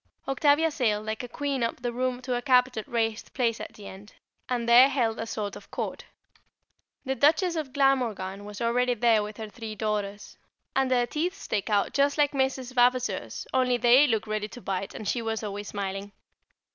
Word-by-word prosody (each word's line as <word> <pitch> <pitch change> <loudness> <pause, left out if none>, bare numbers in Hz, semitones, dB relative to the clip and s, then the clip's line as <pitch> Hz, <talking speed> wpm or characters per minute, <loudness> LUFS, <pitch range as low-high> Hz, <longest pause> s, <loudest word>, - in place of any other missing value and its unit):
Octavia 290 +4 +3
sailed 215 -7 0
like 220 0 -3
a 245 - -6
queen 280 +1 -3
up 230 - -1
the 240 0 -3
room 255 0 -2
to 255 -1 -2
a 245 - -1
carpeted 250 -4 +2
raised 225 -2 -2
place 230 -3 +1
at - - -7
the 205 - -12
end, 200 +3 -11 0.4
and 240 -2 -1
there 245 +3 +8
held 235 -5 0
a 225 - -3
sort 210 -3 -4
of - - -12
court. - - -5 1.0
The 265 - 0
Duchess 315 +6 +3
of 305 -5 -3
Glamorgan 235 -9 0
was 205 +1 -8
already 245 +1 +1
there 230 -1 +3
with 210 0 -6
her 220 - -6
three 220 -1 -7
daughters, 210 -1 -3 0.4
and 270 -1 +2
their 245 -1 +3
teeth 330 +9 -2
stick 210 - -3
out 205 -1 +1
just 280 +1 +2
like 290 -1 +3
Mrs. 265 -2 -1
Vavaseur's; 245 - +1
only 255 -1 +2
they 245 +5 +6
look 225 -4 0
ready 215 -1 -2
to 245 - -11
bite, 195 -3 -4
and 215 - -6
she 240 - 0
was 225 -1 -3
always 205 0 -5
smiling. 200 0 -4
240 Hz, 195 wpm, -27 LUFS, 215-260 Hz, 1.0 s, there